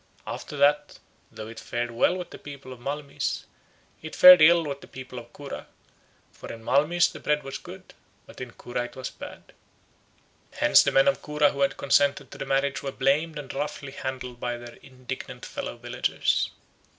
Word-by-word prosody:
After 145 - -6
that, 145 +1 +3 0.3
though 110 - -8
it 115 - -9
fared 120 0 -3
well 120 +10 +2
with 180 - -7
the - - -10
people 140 -2 -9
of 125 - -14
Malmyz, 140 +2 -3 0.6
it 160 - -8
fared 180 -2 +10
ill 170 +2 +7
with 140 -1 -5
the - - -12
people 130 -1 -8
of 120 0 -14
Cura; 145 -1 -8 0.6
for - - -10
in 115 -1 -10
Malmyz 150 +8 +3
the - - -9
bread 150 0 0
was 135 0 -6
good, - - -12 0.3
but - - -13
in 125 - -5
Cura 120 0 -4
it - - -11
was 130 - -5
bad. - - -11 1.0
Hence - - +6
the - - +1
men 135 - +5
of 185 - +2
Cura 150 -1 +2
who 140 - -5
had 135 -1 +2
consented 140 0 +2
to - - -11
the 135 - -4
marriage 135 0 +1
were 135 - -4
blamed 145 +4 +1
and 145 -3 -7
roughly 145 -1 -4
handled 130 -2 -6
by 120 0 -2
their 120 0 -11
indignant 130 -1 -8
fellow - - -6
villagers. - - 0
140 Hz, 185 wpm, -26 LUFS, 125-150 Hz, 1.0 s, fared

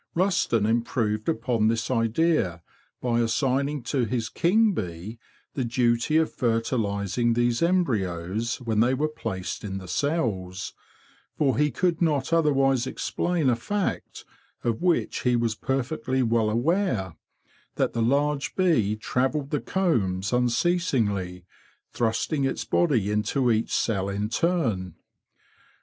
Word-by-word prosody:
Rusden 170 - +2
improved 110 -2 0
upon 115 -1 +1
this 115 +2 0
idea 115 - +1 0.4
by 120 -2 +1
assigning 135 +4 0
to 125 +1 0
his 115 -1 -2
king 215 +5 +3
bee 95 - -5 0.3
the 130 - -2
duty 120 +4 +1
of 160 0 +1
fertilising 115 -2 0
these 120 0 +1
embryos 110 - 0
when 115 -3 -1
they 125 +4 +3
were 150 +4 0
placed 110 -11 -5
in 95 -2 -4
the 95 -1 -8
cells, 100 - -2 0.6
for 135 -5 +2
he 150 +3 +2
could 175 +2 0
not 150 -2 +1
otherwise 135 -5 +3
explain 170 +2 -1
a 125 - +4
fact 200 - -3 0.4
of 115 +2 -1
which 175 -2 +1
he 125 -1 +1
was 115 -1 +1
perfectly 130 +1 -1
well 115 -2 +2
aware—that 120 - -2
the 115 - -1
large 140 +4 +1
bee 155 - +2
travelled 135 +6 -1
the 150 - 0
combs 100 - 0
unceasingly, 120 - 0 0.5
thrusting 120 +5 0
its 135 - -1
body 120 - +1
into 115 +4 +1
each 110 0 0
cell 100 -3 0
in 100 +2 -2
turn. 115 - 0
120 Hz, 125 wpm, -25 LUFS, 110-145 Hz, 0.6 s, a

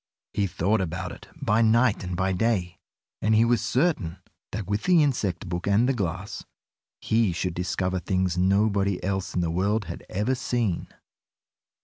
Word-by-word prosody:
He 100 -1 +1
thought 95 +4 +1
about 85 -1 -3
it - - -11
by 110 +2 +2
night 115 -1 +3
and 90 0 -3
by 95 +1 +1
day, 90 -3 0 0.4
and 110 +2 +3
he 110 +2 +5
was 120 -1 +2
certain 115 - 0 0.3
that 105 0 -4
with 105 +3 -2
the 175 -4 +5
insect 105 - -1
book 85 +1 -3
and 105 +5 +4
the 135 - +2
glass, 95 -3 -3 0.6
he 110 -3 +2
should 90 +1 -2
discover 90 +1 -1
things 95 -1 0
nobody 100 +1 +2
else 95 0 -2
in 90 - +2
the 85 -1 0
world 100 +5 0
had - - -7
ever 105 +7 0
seen. 120 -7 -1
100 Hz, 165 wpm, -26 LUFS, 90-110 Hz, 0.6 s, he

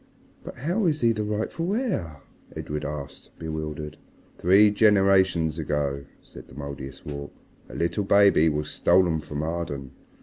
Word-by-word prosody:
"But - - -8
how 175 - 0
is 155 -2 0
he 115 -1 +4
the 110 -1 -2
rightful 110 - -2
heir?" 95 - -3 0.3
Edred 75 0 -4
asked, 70 -2 -7
bewildered. 75 -1 -5 0.4
"Three 100 +4 +5
generations 95 -6 +3
ago," 70 -2 -2 0.2
said - - -13
the - - -15
Mouldiestwarp, 70 0 -7 0.4
"a - - -10
little 85 +5 -1
baby 100 -5 +5
was 75 0 -2
stolen 85 -4 +3
from 75 0 -5
Arden. 80 -5 -4
80 Hz, 135 wpm, -25 LUFS, 75-105 Hz, 0.4 s, Three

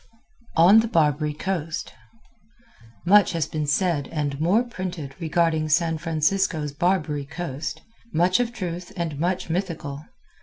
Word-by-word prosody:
On 180 +7 +7
the 225 - +1
Barbary 150 - +1
Coast 165 -2 -3 1.1
Much 200 +2 +5
has 165 -3 0
been 150 0 -3
said 150 -2 +1
and 145 -2 -2
more 195 +9 +3
printed 185 - -6
regarding 160 -2 +1
San 160 0 +2
Francisco's 160 -1 0
Barbary 155 -2 0
Coast 155 -2 -5 0.3
much 180 +5 +3
of 240 -1 0
truth 180 -5 -5
and 160 -4 -3
much 180 +3 -1
mythical. 165 -5 -4
165 Hz, 125 wpm, -24 LUFS, 150-185 Hz, 1.1 s, On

